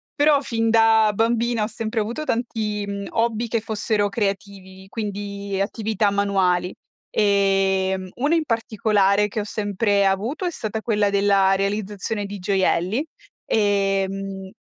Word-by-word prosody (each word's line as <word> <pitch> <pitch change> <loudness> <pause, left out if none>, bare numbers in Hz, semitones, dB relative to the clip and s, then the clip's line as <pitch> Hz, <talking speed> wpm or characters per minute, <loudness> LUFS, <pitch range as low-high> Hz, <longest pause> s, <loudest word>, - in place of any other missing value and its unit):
però 290 -1 +4
fin 225 -3 -1
da 225 -1 +5
bambina 230 +1 +1
ho 210 - 0
sempre 225 0 -3
avuto 235 +8 -3
tanti 220 -5 -2 0.2
hobby 230 0 0
che 230 0 0
fossero 215 -1 0
creativi, 195 -2 -4
quindi 200 -2 -4
attività 210 0 0
manuali. 190 -3 +1 0.4
Ehm, 195 -2 +1
uno 290 +7 +1
in 325 - +1
particolare 210 -4 +1
che 210 - -4
ho - - -1
sempre 205 -1 0
avuto 215 - -1
è 350 - 0
stata 220 -5 -4
quella 210 -3 +1
della 200 -1 +3
realizzazione 205 +1 -2
di 200 +1 -6
gioielli, 190 - +1 0.4
ehm, 195 -2 0
205 Hz, 125 wpm, -22 LUFS, 195-225 Hz, 0.4 s, da